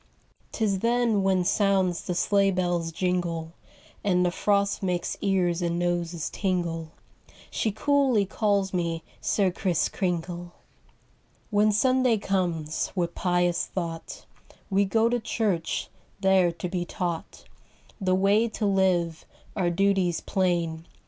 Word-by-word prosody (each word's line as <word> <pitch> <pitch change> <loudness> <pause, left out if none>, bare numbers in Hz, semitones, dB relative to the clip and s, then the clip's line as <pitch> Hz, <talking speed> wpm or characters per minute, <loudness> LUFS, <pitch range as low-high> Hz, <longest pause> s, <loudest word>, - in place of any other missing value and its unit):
'Tis 205 -4 0
then 235 -1 +2
when 190 -1 +2
sounds 190 -2 +1
the 180 - -1
sleigh 200 +2 +3
bell's 175 -3 0
jingle 170 -2 -2 0.5
And 180 -2 +2
the 175 - +1
frost 200 +2 +1
makes 180 -2 -1
ears 180 -3 +1
and 170 -1 0
noses 175 -2 -1
tingle, 170 -4 -2 0.6
She 220 - 0
coolly 265 -2 +2
calls 200 -1 0
me 170 -2 -1 0.2
'Sir 195 -3 +1
Kriss 175 -2 0
Kringle.'" 175 -2 -3 1.0
Copyrighted, - - -17
18U7 - - -1
c^^aHEN - - +1
Sunday 255 0 +3
comes, 175 -6 -1
with 170 -2 -1
pious 175 -1 +1
thought 165 -3 -5 0.5
We 200 +1 +3
go 225 +4 +2
to 240 +1 +1
church, 210 -6 -1 0.3
there 190 -3 +4
to 170 +2 -5
be 180 0 -2
taught 175 -1 -4 0.6
The 185 -1 +2
way 200 +4 +3
to 220 -1 -3
live, 185 -4 +1 0.3
our 185 -4 +1
duties 185 -1 +1
plain. 170 -3 -1
185 Hz, 130 wpm, -26 LUFS, 175-200 Hz, 1.0 s, there